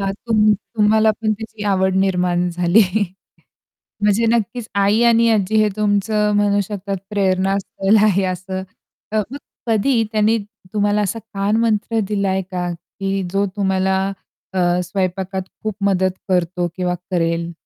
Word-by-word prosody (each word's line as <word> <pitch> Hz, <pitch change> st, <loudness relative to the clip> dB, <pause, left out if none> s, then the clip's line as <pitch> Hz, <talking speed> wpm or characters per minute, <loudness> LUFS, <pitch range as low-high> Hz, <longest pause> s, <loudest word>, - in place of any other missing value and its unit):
हां, 195 Hz, 0 st, -1 dB
तुम 215 Hz, -2 st, +4 dB
तुम्हाला 215 Hz, +1 st, +2 dB
पण 215 Hz, -1 st, +1 dB
त्याची 220 Hz, 0 st, -8 dB
आवड 190 Hz, 0 st, +1 dB
निर्माण 180 Hz, -2 st, +1 dB
झाली 175 Hz, +4 st, +3 dB, 1.2 s
म्हणजे 210 Hz, +2 st, +2 dB
नक्कीच 235 Hz, 0 st, -1 dB
आई 200 Hz, +3 st, +3 dB
आणि 230 Hz, 0 st, +4 dB
आज्जी 215 Hz, -1 st, +1 dB
हे 215 Hz, -1 st, +4 dB
तुमचं 210 Hz, 0 st, +1 dB
म्हणू 205 Hz, 0 st, +2 dB
शकतात, 200 Hz, 0 st, -4 dB
प्रेरणा 195 Hz, -1 st, +1 dB
स्थल 195 Hz, +2 st, +1 dB
आहे 195 Hz, -2 st, +3 dB
असं 185 Hz, +1 st, -5 dB, 0.5 s
अ, -, -, 0 dB
मग 275 Hz, -, -6 dB, 0.3 s
कधी 230 Hz, +2 st, +2 dB
त्यांनी 215 Hz, +1 st, +3 dB, 0.3 s
तुम्हाला 205 Hz, 0 st, +1 dB
असा 205 Hz, +3 st, -2 dB
कानमंत्र 220 Hz, +1 st, 0 dB
दिलाय 195 Hz, -2 st, 0 dB
का? 180 Hz, -1 st, -2 dB, 0.3 s
की 195 Hz, 0 st, -1 dB
जो 200 Hz, +1 st, +1 dB
तुम्हाला 190 Hz, -1 st, +1 dB, 0.6 s
अ, 190 Hz, -, -2 dB, 0.3 s
स्वयंपाकात 190 Hz, 0 st, -2 dB, 0.2 s
खूप 215 Hz, -2 st, -2 dB
मदत 190 Hz, -1 st, +2 dB, 0.2 s
करतो 180 Hz, -1 st, 0 dB
किंवा 180 Hz, -1 st, -1 dB, 0.2 s
करेल? 170 Hz, -1 st, 0 dB
200 Hz, 135 wpm, -19 LUFS, 190-215 Hz, 1.2 s, तुम